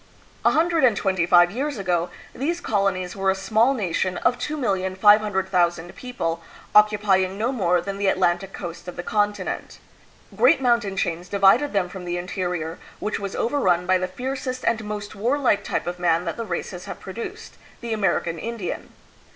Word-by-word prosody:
A - - +5
hundred 330 0 +2
and 235 -6 +4
twenty 190 -3 0
five 175 0 +6
years 275 +5 -3
ago, 180 -3 0 0.2
these 335 +7 -2
colonies 195 - -1
were 195 -1 0
a 190 - +2
small 220 +7 +2
nation 185 -3 -1
of 245 - +1
2,500,000 190 - +2
people, 170 -10 -3 0.3
occupying 205 -3 +4
no 225 +4 0
more 180 -8 +2
than 195 +2 -5
the 200 - +1
Atlantic 185 0 +1
coast 175 -2 -8
of 180 - -6
the 175 - -5
continent. 205 0 -2 0.6
Great - - +5
mountain 235 -6 +1
chains 175 +1 -2
divided 200 +8 +4
them 195 -3 +1
from 180 0 -9
the 175 0 -2
interior, 175 -2 -3 0.2
which 215 - -3
was 200 -1 -5
overrun 185 -9 +1
by 185 0 +3
the 185 - -1
fiercest 255 +5 -4
and 225 -1 +1
most 210 -1 -5
warlike 240 +2 +1
type - - -2
of 175 0 -4
man 170 0 +2
that - - -3
the 230 - -4
races 180 -1 -5
have - - -7
produced 230 - -8 0.2
the 235 -2 -3
American 175 -5 0
In 230 +5 -5
dian. 185 -5 -5
195 Hz, 170 wpm, -23 LUFS, 180-230 Hz, 0.6 s, five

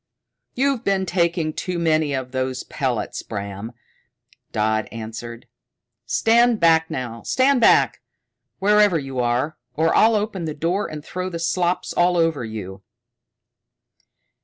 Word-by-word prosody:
"You've 270 -2 +1
been 195 -1 +1
taking 170 -3 0
too 180 +2 -3
many 155 -3 +1
of 130 -1 -4
those 130 0 -2
pellets, 125 -5 -3
Bram," 100 +1 -6 0.8
Dodd 110 0 0
answered. 115 +1 -7 0.6
"Stand 235 - +3
back 160 -1 +4
now! 120 -3 -5
Stand 260 0 +2
back, - - +4 0.6
wherever 205 -2 +4
you 135 -3 -5
are, 125 +5 0 0.2
or 160 +2 +2
I'll 225 +1 +5
open 205 -4 -2
the 155 -2 -4
door 175 +7 -1
and 150 -1 -8
throw 185 0 -4
the 170 - -5
slops 175 +1 -1
over 165 -5 +2
you." 100 -4 -7
160 Hz, 125 wpm, -22 LUFS, 125-190 Hz, 0.8 s, I'll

